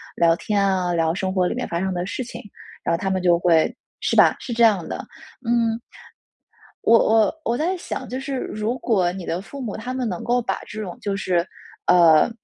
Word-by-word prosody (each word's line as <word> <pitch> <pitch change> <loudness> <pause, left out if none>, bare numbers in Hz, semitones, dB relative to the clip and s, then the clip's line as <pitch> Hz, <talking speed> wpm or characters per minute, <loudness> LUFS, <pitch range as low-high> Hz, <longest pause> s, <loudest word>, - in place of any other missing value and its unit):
聊 165 -1 +4
天 205 +2 0
啊、 185 -2 +1
聊 165 -1 +1
生 190 0 -2
活 185 -2 +2
里 - - -2
面 - - -3
发 170 - -2
生 190 0 -1
的 175 0 -2
事 225 +6 -4
情， 235 - -9 0.4
然 - - +1
后 - - -2
他 190 +1 -2
们 190 - 0
就 175 -1 +4
会 165 -2 +3 0.3
是 - - 0
吧， - - +6
是 240 - -5
这 235 - +2
样 205 -7 +4
的。 - - -4 0.5
嗯， 230 -1 +1 1.0
我 230 - +6
我 220 -1 +3
我 235 - 0
在 345 +6 0
想， 350 - -5
就 255 - -3
是 270 0 -4
如 215 +3 -3
果 185 -7 +1
你 185 -2 -7
的 175 +3 -2
父 275 +7 -9
母 220 -5 -4
他 245 +4 -5
们 255 -2 -2
能 180 - -4
够 245 +1 +1
把 - - -2
这 215 -1 -6
种 180 -4 -6
就 200 -1 -2
是， 175 -3 0 0.4
呃， 170 0 +6
195 Hz, 235 characters per minute, -22 LUFS, 175-235 Hz, 1.0 s, 吧